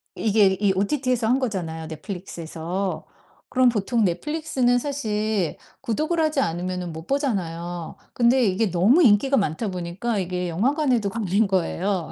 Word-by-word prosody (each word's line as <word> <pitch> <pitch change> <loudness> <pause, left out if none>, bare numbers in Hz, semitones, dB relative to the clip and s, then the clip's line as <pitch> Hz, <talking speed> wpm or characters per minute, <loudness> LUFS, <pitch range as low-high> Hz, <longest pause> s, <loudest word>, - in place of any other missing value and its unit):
이게 205 -3 +3
이 200 -2 +3
OTT에서 250 +3 0
한 255 +3 +3
거잖아요 170 -10 -3
넷플릭스에서. 175 +2 -5 0.4
그럼 255 -1 +3
보통 230 +1 0
넷플릭스는 260 - 0
사실 215 - -1 0.2
구독을 305 +8 -1
하지 310 -2 +1
않으면은 180 -3 -2
못 160 +1 -8
보잖아요. 175 - -2 0.2
근데 245 +2 +3
이게 195 +1 +1
너무 215 - +4
인기가 250 +4 +4
많다 200 +2 -1
보니까 185 +5 -3
이게 180 -1 -2
영화관에도 245 - +1
걸린 205 -1 +1
거예요. 185 -1 -1
205 Hz, 345 characters per minute, -24 LUFS, 180-250 Hz, 0.4 s, 너무